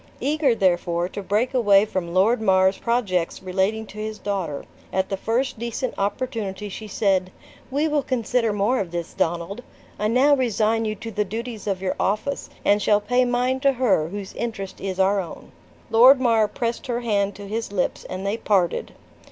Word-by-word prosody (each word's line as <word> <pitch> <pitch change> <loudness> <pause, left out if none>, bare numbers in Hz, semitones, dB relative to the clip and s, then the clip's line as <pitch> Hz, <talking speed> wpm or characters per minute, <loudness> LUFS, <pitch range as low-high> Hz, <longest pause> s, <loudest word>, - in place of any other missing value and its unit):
Eager, 290 -4 +2
therefore, 175 -3 +1
to 205 - -6
break 210 +7 0
away 205 -5 +5
from 185 -5 -3
Lord 210 +7 +3
Mar's 190 -2 +3
projects 195 -9 -1
relating 190 +4 0
to 210 - -11
his 215 0 -4
daughter, 190 -9 -3 0.3
at 190 0 0
the 195 - -1
first 230 +5 -1
decent 235 +2 -3
opportunity 205 -1 -3
she 215 +2 -7
said: 190 -3 +1 0.4
"We 285 +4 +1
will 300 -1 +1
consider 240 -3 0
more 210 +5 +1
of 190 - -2
this, 170 -1 -5
Donald. 170 +7 -2 0.4
I 210 - +1
now 260 +6 +4
resign 225 -3 +1
you 215 0 -2
to 225 +2 -7
the 210 0 0
duties 220 +2 -6
of 190 -2 -2
your 185 - -1
office, 215 +8 -1 0.2
and 205 +1 +4
shall 205 +1 +4
pay 245 +4 +2
mine 250 +2 +1
to 275 0 +3
her, 225 -11 +2
whose 195 +2 -7
interest 220 -5 -5
is 190 -1 -4
our 195 +1 +3
own." 175 -3 -8 0.4
Lord 255 +4 +7
Mar 230 -4 +3
pressed 235 +3 -3
her 240 -1 -1
hand 205 -3 0
to 205 -1 -9
his 220 +1 -3
lips, 190 -3 -1
and 185 +1 -6
they 200 +3 0
parted. 190 -6 0
210 Hz, 185 wpm, -23 LUFS, 190-240 Hz, 0.4 s, Lord